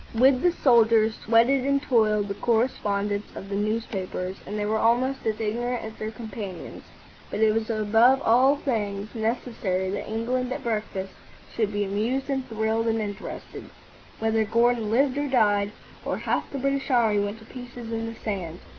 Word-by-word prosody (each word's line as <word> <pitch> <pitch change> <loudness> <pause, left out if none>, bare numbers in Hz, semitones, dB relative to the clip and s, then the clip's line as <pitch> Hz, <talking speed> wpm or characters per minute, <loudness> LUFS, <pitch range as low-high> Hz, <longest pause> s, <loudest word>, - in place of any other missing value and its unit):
With 255 +2 +5
the 355 - +4
soldiers 230 -7 +4
sweated 235 +4 +4
and 280 +1 +2
toiled 215 -6 +2
the 200 - -2
correspondents 205 -3 0
of 195 - -8
the 200 - -2
newspapers, 200 -3 -2
and 210 - -4
they 205 - -1
were 220 +1 0
almost 245 +3 +1
as 215 -1 -1
ignorant 240 +3 -2
as 220 - -6
their 215 0 -5
companions. 215 -5 -7 0.5
But - - -3
it 220 -1 +5
was 225 0 -1
above 225 +4 +4
all 255 +5 +5
things 210 -7 -3
necessary 220 -5 -1
that 200 - -4
England 245 +3 -1
at - - -4
breakfast 210 -4 -3 0.4
should 215 -3 0
be 205 0 0
amused 225 +8 -1
and 265 -1 -2
thrilled 220 +1 0
and 225 0 +1
interested, 205 -2 -6 0.5
whether 225 0 +1
Gordon 230 0 +2
lived 265 +4 +2
or 290 - -1
died, 205 -6 +2 0.3
or - - -2
half - - -1
the 280 - -4
British 275 +1 -1
army 225 -5 +3
went 205 +2 -4
to 220 - -15
pieces 245 -1 -9
in 225 0 -2
the 230 - -6
sands. 185 -7 -5
225 Hz, 170 wpm, -25 LUFS, 210-245 Hz, 0.5 s, With